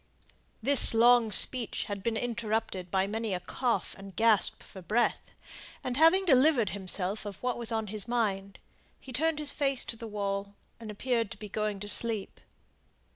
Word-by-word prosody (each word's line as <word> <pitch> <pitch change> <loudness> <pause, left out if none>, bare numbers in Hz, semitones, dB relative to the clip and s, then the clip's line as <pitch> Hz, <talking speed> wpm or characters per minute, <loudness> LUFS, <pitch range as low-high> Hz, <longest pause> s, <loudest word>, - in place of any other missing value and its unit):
This 280 -4 +6
long 235 -1 +4
speech 245 +1 +5
had 200 -1 -6
been 225 +2 -2
interrupted 220 -6 -3
by 190 +1 0
many 215 -1 -3
a - - -4
cough 240 +7 -3
and 195 -1 -12
gasp 225 -2 +2
for 190 - -12
breath; 225 +7 -1 0.5
and 250 - -3
having 330 +7 +4
delivered 260 - +3
himself 195 +1 -3
of 205 -2 -7
what 250 -1 -1
was 235 -1 -3
on 220 -1 -2
his 210 +1 -4
mind, 200 -5 -2 0.4
he 260 - -12
turned 320 +5 0
his 300 -1 -4
face 275 -3 0
to - - -7
the 230 0 -9
wall, 200 -1 -4 0.2
and 225 -2 -9
appeared 230 +1 -2
to - - -9
be 210 - -10
going 210 -1 -3
to 205 - -6
sleep. 220 -1 +1
225 Hz, 175 wpm, -28 LUFS, 200-245 Hz, 0.5 s, This